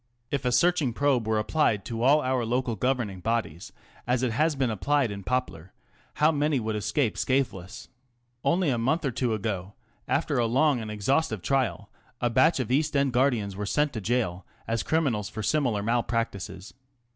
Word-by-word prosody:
If 140 -2 -2
a 125 - +2
searching 150 -1 +2
probe 130 -4 +1
were 110 -1 +1
applied 105 -2 +1
to 115 -1 -4
all 140 +5 +5
our 130 -1 0
local 120 0 -1
govern 125 -1 0
ing 95 - -9
bodies, 110 -2 -2 0.4
as 125 0 +1
it 125 - +1
has 155 +6 +1
been 130 -4 0
applied 135 +3 +1
in 100 -1 -7
Poplar, 95 -8 -3 0.4
how 155 +2 +4
many 150 -2 +1
would 110 -1 -2
escape 110 +3 -1
scatheless? 115 -7 -2 0.6
Only 170 -4 +2
a 120 - 0
month 145 +8 0
or 135 - 0
two 120 -2 -1
ago, 100 -2 -4 0.3
after 145 -3 0
a 120 - +2
long 135 +3 +2
and 110 -1 -6
exhaustive 105 - 0
trial, 130 -9 -1 0.3
a 120 -1 0
batch 160 +6 +4
of 125 -2 -2
East 150 +2 +1
End 140 -2 +1
guardians 120 -7 +1
were 100 +1 -4
sent 150 +5 +1
to 110 - -4
gaol 95 -5 -1 0.2
as 115 0 0
criminals 130 -11 0
for 110 - -6
similar 125 -9 +1
malpractices. 115 -4 -2
120 Hz, 180 wpm, -27 LUFS, 110-140 Hz, 0.6 s, all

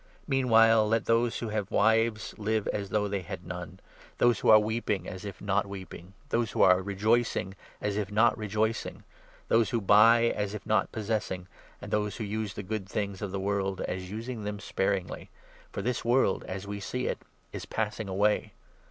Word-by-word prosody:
Meanwhile, 115 -5 +5
let 115 +1 +1
those 115 0 +2
who 115 - -4
have 105 -2 -2
wives 110 +1 +2
live 110 0 0
as 100 -1 -3
if 105 -1 0
they 100 -2 -1
had 85 0 -8
none, 90 +1 -7 0.4
those 120 -3 +3
who - - +1
are 110 - +10
weeping 110 -1 -1
as 95 +2 -7
if 100 -5 -7
not 100 +1 0
30 - - -12
weeping, 95 -1 -9 0.2
those 115 -3 0
who - - +3
are 90 0 +6
rejoicing 105 +1 0 0.3
as 105 -1 -2
if 105 -1 -2
not 110 +3 +4
rejoicing, 110 0 -2 0.4
those 115 -3 +3
who 115 - 0
buy 110 +3 +6
as 105 0 -2
if 100 - -8
not 110 -2 +1
possessing, 105 -4 -3 0.3
and - - -9
those 105 -1 0
who 115 - -5
use 105 0 -3
the 105 - -5
good 100 -1 -4
things 100 -1 -3
of 100 - -3
31 - - -9
the 95 0 -3
world 95 -2 -1
as 90 0 -4
using 110 +2 -5
them 105 0 -4
sparingly; 95 -2 -2 0.4
for 100 - -4
this 125 +2 -1
world 120 -4 +2
as 95 +1 -5
we 100 0 -5
see 125 +5 -3
it - - -2 0.3
is - - -6
passing 110 -1 -3
away. 105 +3 +1
105 Hz, 195 wpm, -29 LUFS, 100-110 Hz, 0.4 s, are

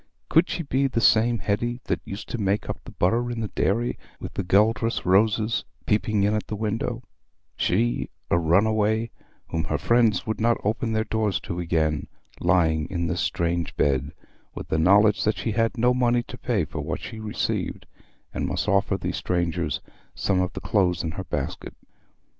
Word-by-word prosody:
Could 165 +2 +4
she 170 - -2
be 140 -1 +1
the 125 - -1
same 115 +1 +4
Hetty 120 +4 -1
that - - -2
used 100 +3 -7
to 120 - -3
make 100 0 0
up - - -4
the - - -11
butter 115 +7 +1
in 120 -1 -3
the 110 -2 -3
dairy 120 +6 0 0.2
with - - -7
the 95 - -2
Guelder 110 +5 +3 0.2
roses 110 +3 +3 0.2
peeping 105 -1 +1
in 105 +1 +2
at 105 - -2
the 105 - -3
window—she, 115 0 -2 0.2
a 85 - +4
runaway 110 +6 +2 0.4
whom 80 0 -1
her - - -1
friends 115 -5 +2
would 110 0 -3
not 115 +1 +3
open 110 +2 0
their 110 0 +1
doors 110 -3 0
to 90 -2 -5
again, 80 -3 0 0.3
lying 85 -3 +2
in 85 -3 -2
this 85 +2 -1
strange 85 -1 -1
bed, 70 0 +1 0.4
with - - -7
the 80 - +1
knowledge 100 +5 +5
that 110 - +1
she 115 - -2
had 115 +3 0
no 125 +2 +3
money 120 -1 +2
to 125 - -9
pay 115 -8 0
for 75 0 -5
what 75 +2 -3
she 110 - -7
received, 110 -1 -2 0.5
and - - -2
must - - -2
offer 100 -1 +2
those 90 - -3
strangers 85 -2 -1 0.3
some 95 -2 +1
of 90 0 -1
the - - -6
clothes 90 -5 +1
in 80 - -2
her 95 +3 -6
basket? - - -4
105 Hz, 180 wpm, -25 LUFS, 90-115 Hz, 0.5 s, knowledge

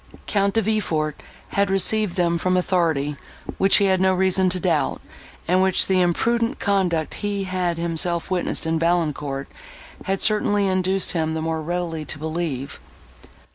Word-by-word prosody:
Count 200 0 0
De 225 - +2
Villefort 170 -8 -1 0.3
had 200 -1 0
received 195 0 +3
them 170 -2 +1
from 185 +2 +1
authority 160 -6 0 0.4
which 195 0 +4
he 200 - +3
had 190 -1 +2
no 190 0 +3
reason 190 0 +2
to 185 0 0
doubt, 165 -7 0 0.5
and 185 +2 +3
which 190 -1 +4
the 185 -1 +2
imprudent 230 +8 0
conduct 180 -6 0
he 205 -1 -3
had 180 -2 -2
himself 170 +1 +1
witnessed 180 -2 -1
in 160 0 0
Valancourt, 150 -5 -1 0.6
had 195 0 -1
certainly 205 -1 +2
induced 190 0 +1
him 160 -2 -1
the - - -2
more 160 0 -2
readily 170 -1 -3
to 150 - -2
believe. 155 -3 -4
180 Hz, 155 wpm, -22 LUFS, 160-195 Hz, 0.6 s, which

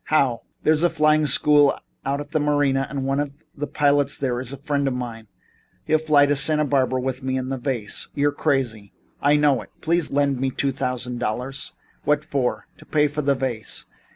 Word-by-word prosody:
"How?" 135 -6 +2 0.2
"There's 155 0 +3
a 175 - +4
flying 155 -1 +3
school 145 +1 +5 0.3
out 140 +1 -1
at 145 0 -8
the 155 - +1
Marina 145 -2 +1
and 135 -2 -3
one 135 +1 0
of 145 -1 -2 0.2
the 145 +1 -4
pilots 145 -2 +2
there 125 -3 -1
is 130 0 -4
a 140 - -6
friend 140 0 -1
of 130 - -1
mine. 115 -3 -6 0.6
He'll 155 - +3
fly 150 -2 +4
to 145 0 +1
Santa 150 +1 +3
Barbara 130 -2 +1
with 130 0 -3
me 130 0 -1
and 130 0 -3
the 135 - -3
vase." 120 -5 -3
"You're 145 0 +2
crazy." 130 -9 -1 0.3
"I 145 +1 +4
know 145 -3 +3
it. - - -13
Please 170 0 +1
lend 140 -2 +1
me 135 0 0
two 135 +1 -1
thousand 125 -1 -3
dollars." 125 +4 -3 0.3
"What 150 0 +1
for?" 135 -5 -1
"To - - -15
pay 150 -1 +3
for 150 +1 -3
the 140 -1 +2
vase." 130 -4 -3
140 Hz, 205 wpm, -23 LUFS, 130-145 Hz, 0.6 s, school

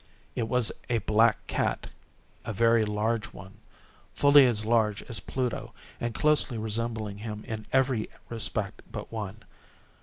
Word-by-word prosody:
It 115 - -1
was 125 -2 +2 0.2
a 120 - +2
black 110 +2 +3
cat—a 110 - -5
very 115 +1 +4
large 110 +2 0
one—fully 135 +8 +2
as 110 -3 0
large 110 -2 +2
as 115 -5 -4
Pluto, 125 +5 -3 0.3
and 120 -2 -3
closely 150 -5 +3
resembling 110 -1 -3
him 105 -1 -6
in 110 -1 -5
every 130 -4 +2 0.2
respect 110 -3 -2
but - - -7
one. 110 -1 -5
110 Hz, 125 wpm, -28 LUFS, 105-120 Hz, 0.3 s, very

